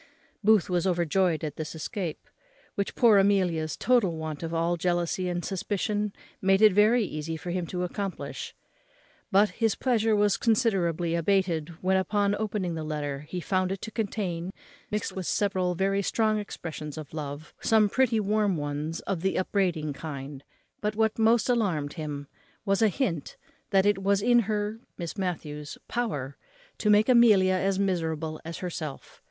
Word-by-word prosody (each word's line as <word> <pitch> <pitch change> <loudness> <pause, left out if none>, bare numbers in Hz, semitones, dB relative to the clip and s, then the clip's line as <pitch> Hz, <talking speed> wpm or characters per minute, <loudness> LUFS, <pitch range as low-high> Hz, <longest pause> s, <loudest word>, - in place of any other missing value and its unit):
Booth 210 -4 +5
was 180 0 0
overjoyed 175 -1 +1
at 150 -2 -4
this 155 0 -5
escape, 170 +1 -5 0.5
which 200 - -3
poor 225 -4 +6
Amelia's 180 -6 +1
total 220 -10 +2
want 155 -2 -5
of 165 -1 -4
all 170 +1 +1
jealousy 175 +1 0
and 175 0 -3
suspicion 205 +2 -1 0.3
made 195 0 +4
it 215 -3 +8
very 215 +4 +5
easy 160 -1 -4
for 175 +2 -5
him 180 -1 -2
to 180 +1 -3
accomplish; 195 +1 -5 0.8
but 200 +1 +5
his 220 +2 0
pleasure 225 -4 +2
was 205 -1 +3
considerably 185 -8 +1
abated 170 -2 +1
when, 190 +1 +3
upon 200 +1 +1
opening 205 -5 -2
the 160 -1 -4
letter, 145 -2 -3
he 180 - -3
found 185 +1 0
it 195 - -3
to 220 - -5
contain, 190 -6 -3 0.4
mixed 210 0 -2
with 185 -2 -5
several 185 -3 0
very 195 +2 +1
strong 215 +1 +1
expressions 160 -6 -6
of 155 -2 -8
love, 150 0 -6
some 220 -2 +4
pretty 235 +1 +2
warm 210 -2 +1
ones 145 +2 -3
of 185 -4 -3
the 190 +1 0
upbraiding 180 -6 0
kind; 140 -2 -7 0.4
but 210 0 -1
what 220 0 +1
most 225 +1 +4
alarmed 185 - 0
him 150 -3 -5 0.4
was 195 0 +1
a 220 - +6
hint 185 - -2 0.3
that 195 -2 +3
it 205 -1 +2
was 200 +1 +2
in 240 +1 +5
her 210 0 -1 0.2
(Miss 170 -2 -5
Matthews's) 150 -6 -4
power 145 - -3 0.4
to 210 - +1
make 210 +1 +5
Amelia 215 -7 +6
as 190 +1 +1
miserable 160 -5 -1
as 165 0 -6
herself. 160 -5 -6
185 Hz, 160 wpm, -27 LUFS, 165-210 Hz, 0.8 s, it